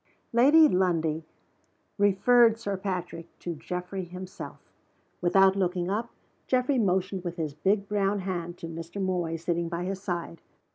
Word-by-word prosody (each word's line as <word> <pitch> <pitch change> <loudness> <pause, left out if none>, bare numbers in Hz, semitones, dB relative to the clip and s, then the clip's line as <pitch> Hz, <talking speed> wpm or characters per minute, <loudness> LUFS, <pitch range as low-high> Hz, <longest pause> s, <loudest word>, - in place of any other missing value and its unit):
Lady 290 +7 +7
Lundie 165 - 0 0.7
referred 225 +3 +5
Sir 205 -3 -3
Patrick 180 -3 -4
to 175 - -5
Geoffrey 180 +4 -5
himself. 180 +2 -8 0.6
Without 190 +2 +5
looking 180 -1 0
up, 225 +4 -2 0.4
Geoffrey 255 +1 +2
motioned 190 -2 0
with 175 -1 -4
his 155 -3 -3
big 195 +6 0
brown 200 -1 0
hand 175 -2 -4
to - - -8
Mr. 165 +3 -7
Moy, 180 -4 -1
sitting 170 0 -2
by 170 0 -3
his 190 +1 -4
side. 170 -3 -4
185 Hz, 140 wpm, -27 LUFS, 170-200 Hz, 0.7 s, Lady